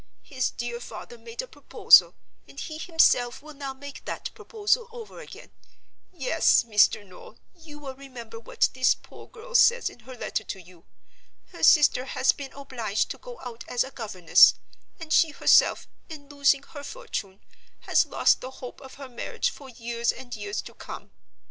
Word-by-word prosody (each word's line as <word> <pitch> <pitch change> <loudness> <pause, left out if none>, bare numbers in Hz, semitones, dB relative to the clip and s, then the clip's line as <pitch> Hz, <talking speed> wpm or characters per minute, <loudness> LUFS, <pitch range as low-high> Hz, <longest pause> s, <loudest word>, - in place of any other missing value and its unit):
His 260 -4 -2
dear 240 0 -5
father 240 0 -9
made 230 - -7
a - - -10
proposal, - - +5 0.3
and 275 - -11
he 310 -1 -6
himself 275 -7 +2
will 310 0 -11
now 275 -1 -6
make 280 +1 -10
that - - -5
proposal 455 +2 -1
over 460 -2 -10
again. - - -12 0.6
Yes, 320 -4 +3
Mr. 210 -2 +3
Noel, 185 -2 -15 0.2
you 320 -4 -14
will 280 -3 -8
remember 250 -4 -10
what 225 - 0
this 255 0 +3
poor - - -15
girl - - -13
says 485 0 +4
in - - -17
her 250 +2 -12
letter 215 - -3
to 195 - -7
you. 175 -1 -18 0.7
Her - - -12
sister 290 -5 +5
has 265 - +2
been 275 -2 -9
obliged 240 -7 -3
to - - -8
go - - -11
out 235 -2 -8
as 245 - +1
a 265 - -9
governess; 210 -9 +5 0.4
and 325 -1 -4
she 325 - +5
herself, 295 - +4 0.2
in 295 -3 -10
losing 280 -1 +2
her 285 0 -11
fortune, 280 - -6 0.4
has - - +2
lost - - +2
the 255 - -6
hope 260 -1 -10
of 265 -1 -12
her 275 -1 -9
marriage 255 - -3
for 275 - -13
years 235 -1 -2
and 245 -1 -9
years 205 -1 -4
to - - -11
come. - - -10
265 Hz, 175 wpm, -26 LUFS, 235-305 Hz, 0.7 s, proposal